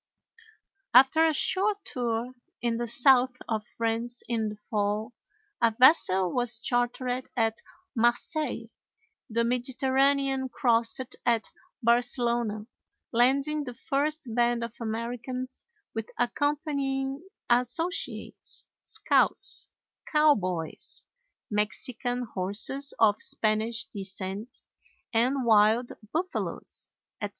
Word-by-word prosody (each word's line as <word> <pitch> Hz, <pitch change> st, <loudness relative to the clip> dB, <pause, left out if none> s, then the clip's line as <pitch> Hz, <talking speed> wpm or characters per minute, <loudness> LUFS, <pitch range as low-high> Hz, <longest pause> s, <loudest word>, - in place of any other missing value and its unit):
After 270 Hz, +6 st, +7 dB
a -, -, +3 dB
short 395 Hz, +7 st, +2 dB
tour 240 Hz, 0 st, -2 dB, 0.3 s
in 235 Hz, -1 st, -1 dB
the 240 Hz, 0 st, -2 dB
south 250 Hz, +1 st, +4 dB
of 220 Hz, -3 st, -1 dB
France 230 Hz, +1 st, -3 dB
in 225 Hz, -2 st, 0 dB
the 210 Hz, -, -7 dB
fall, 210 Hz, +2 st, -2 dB, 0.5 s
a 230 Hz, -2 st, +3 dB
vessel 190 Hz, -, +5 dB
was 240 Hz, -2 st, +1 dB
chartered 245 Hz, +1 st, -1 dB
at 225 Hz, -1 st, +1 dB, 0.3 s
Marseilles, 240 Hz, +6 st, 0 dB, 0.6 s
the 235 Hz, +1 st, +1 dB
Mediterranean 265 Hz, +2 st, +1 dB
crossed 235 Hz, +1 st, +1 dB, 0.2 s
at 230 Hz, -2 st, +1 dB, 0.3 s
Barcelona, 235 Hz, -2 st, +1 dB, 0.5 s
landing 275 Hz, +5 st, +2 dB
the 250 Hz, -3 st, -7 dB
first 295 Hz, +4 st, -1 dB
band 240 Hz, 0 st, +2 dB
of 235 Hz, -, -5 dB
Americans 245 Hz, +3 st, -4 dB, 0.3 s
with 225 Hz, -1 st, -4 dB
accompanying 275 Hz, +1 st, -1 dB, 0.3 s
associates, 250 Hz, +10 st, -1 dB, 0.2 s
scouts, -, -, +1 dB, 0.4 s
cowboys, 190 Hz, -, +1 dB, 0.5 s
Mexican 245 Hz, +4 st, -1 dB
horses 220 Hz, +7 st, -1 dB
of 215 Hz, -2 st, +4 dB
Spanish 220 Hz, +2 st, 0 dB
descent, 195 Hz, +2 st, -7 dB, 0.5 s
and 250 Hz, +3 st, +2 dB
wild 220 Hz, +2 st, +4 dB, 0.2 s
buffaloes, 360 Hz, +4 st, -4 dB, 0.3 s
etc. -, -, -2 dB
240 Hz, 95 wpm, -28 LUFS, 225-270 Hz, 0.6 s, After